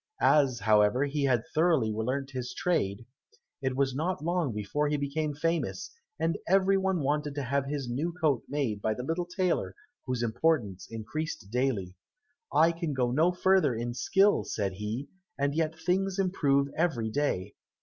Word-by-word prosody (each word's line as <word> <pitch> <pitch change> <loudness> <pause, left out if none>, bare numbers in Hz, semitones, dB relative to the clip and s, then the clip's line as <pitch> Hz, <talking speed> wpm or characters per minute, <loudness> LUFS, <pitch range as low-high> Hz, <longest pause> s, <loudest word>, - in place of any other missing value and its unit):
As, 135 -6 +4
however, 105 +5 +4
he 145 0 -1
had 125 -4 +2
thoroughly 155 -9 +3
learnt 130 +5 -2
his 125 -2 -5
trade, 115 - 0 0.6
it 130 -1 -1
was 135 -1 +1
not 160 +3 -2
long 170 -4 0
before 105 +8 -1
he 150 0 0
became 145 +1 -2
famous, 165 +3 -2 0.3
and 165 - 0
every 195 +1 +4
one 190 -3 +1
wanted 145 +1 -1
to 145 - -2
have 135 +2 -1
his 140 -2 -3
new 140 +8 -1
coat 155 -8 +1
made 130 -8 -1
by 110 +1 0
the 125 - -5
little 165 +5 -2
tailor, 180 -1 -1 0.3
whose 125 -2 -1
importance 115 - 0
increased 115 0 -5
daily. 120 -8 0 0.6
"I 165 +1 +5
can 165 -3 -3
go 125 -2 0
no 160 +7 +3
further 180 -7 +3
in 120 +1 -3
skill," 195 - +3
said 100 -3 -2
he, 105 +8 -4 0.3
"and 140 0 0
yet 160 0 -1
things 190 +1 0
improve 145 -8 +2
every 135 -10 0
day." 105 -8 -1
140 Hz, 165 wpm, -29 LUFS, 120-165 Hz, 0.6 s, I